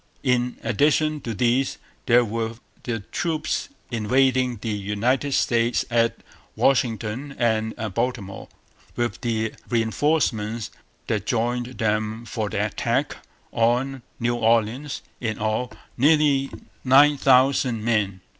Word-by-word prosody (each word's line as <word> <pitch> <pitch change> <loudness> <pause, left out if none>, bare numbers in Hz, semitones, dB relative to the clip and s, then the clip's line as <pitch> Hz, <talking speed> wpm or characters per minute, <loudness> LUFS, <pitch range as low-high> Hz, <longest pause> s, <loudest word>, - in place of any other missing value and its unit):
In 125 -2 +1
addition 150 +6 +2
to 115 -3 -4
these 125 +4 +1 0.3
there 120 -1 +5
were 115 +1 -3 0.3
the 115 -3 -2
troops 155 - -2 0.2
invading 125 +2 +2
the 115 - -2
United 105 +8 0
States 120 0 +1
at 115 -1 +2 0.4
Washington 125 +1 0
and 110 -2 0 0.2
Baltimore, 115 -4 -3 0.5
with 120 -4 -2
the 110 -2 -1 0.2
reinforcements 115 -2 0 0.3
that 105 -2 -2
joined 120 +2 -1
them 110 +1 -1
for 110 -1 -3
the - - -1
attack - - -1 0.4
on 125 +3 +1 0.2
New 120 0 0
Orleans 115 +5 +1 0.2
in 110 -3 -2
all, 110 +3 -1 0.3
nearly 140 0 +3 0.3
nine 140 +3 +6
thousand 130 -3 +3
men. 105 -5 0
120 Hz, 110 wpm, -23 LUFS, 110-130 Hz, 0.5 s, nine